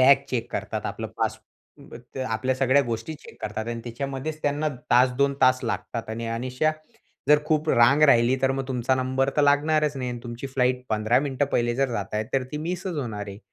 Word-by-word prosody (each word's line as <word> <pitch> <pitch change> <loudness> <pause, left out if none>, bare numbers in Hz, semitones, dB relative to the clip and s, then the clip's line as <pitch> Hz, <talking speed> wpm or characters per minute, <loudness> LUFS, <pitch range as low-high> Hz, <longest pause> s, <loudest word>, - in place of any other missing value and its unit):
Bag 135 +2 +6
check 120 -2 -2
करतात. - - -3
आपलं - - -4
pass - - 0 0.5
अ, - - -7 0.2
ते 130 - -3
आपल्या 130 +2 -1
सगळ्या 135 +2 +3
गोष्टी 115 +4 -4
चेक 150 - -15
करतात. 110 +1 -3
आणि 120 0 -3
त्याच्यामध्येच 135 +5 -4
त्यांना 145 +1 0 0.2
1-2 125 +3 +4
तास 130 -1 +5
लागतात, 115 -2 -4
आणि 115 +1 -4
अनिष्या 125 +6 0 0.6
जर 150 0 +7
खूप 155 0 +1
रांग 130 +6 +5
राहिली, 125 -3 +5
तर 135 - +3
मग 135 0 -3
तुमचा 130 0 +1
नंबर 130 +1 0
तर 150 - +4
लागणारच 150 +1 +3
नाही. 130 -2 -3
आणि 120 -1 -6
तुमची 120 +2 -6
फ्लाइट 125 -1 0
15 110 +2 +2
मिनिटं 140 -1 0
पहिले 120 0 +1
जर 135 0 +2
जात 100 -2 -4
आहे, 105 +1 0
तर 135 - +2
ती 150 - -2
मिसच 175 +3 -3
होणार 110 -7 -4
आहे. 100 0 -8
130 Hz, 200 wpm, -25 LUFS, 120-140 Hz, 0.6 s, जर